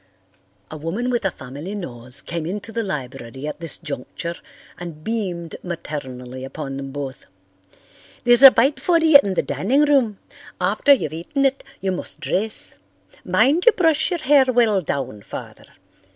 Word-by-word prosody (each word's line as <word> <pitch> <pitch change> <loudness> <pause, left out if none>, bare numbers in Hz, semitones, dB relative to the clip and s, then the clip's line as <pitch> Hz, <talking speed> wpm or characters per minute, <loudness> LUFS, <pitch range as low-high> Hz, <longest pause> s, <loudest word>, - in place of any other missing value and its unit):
A 155 - -6
woman 195 +12 -2
with 240 -4 -1
a - - +3
family 145 +7 -8
nose 125 - -5
came 170 -2 -4
into 205 +4 -5
the 230 - -2
library 135 - -6
at 150 - -5
this 165 -4 -2
juncture 160 +2 -5 0.5
and 165 -3 -8
beamed 180 -7 -3
maternally 130 -7 -6
upon 135 0 -6
them 135 0 -6
both. 135 -1 -6 1.0
"There's 240 0 +6
a 270 - +13
bite 265 +4 +2
for 350 -2 +3
you 320 -3 +8
in 195 -2 -2
the - - +1
dining 260 +9 +1
room. 260 -8 +2 0.4
After 285 - +2
you've 195 - +3
eaten 275 - -1
it 270 0 +1 0.2
you 190 0 0
must 185 - -4
dress. 215 +3 -1 0.5
Mind 310 - +2
you 475 - +9
brush 325 -6 +2
your 350 -3 -2
hair 275 0 +5
well 230 -6 +3
down, 130 - -4
Father. - - -9
185 Hz, 160 wpm, -21 LUFS, -, 1.0 s, a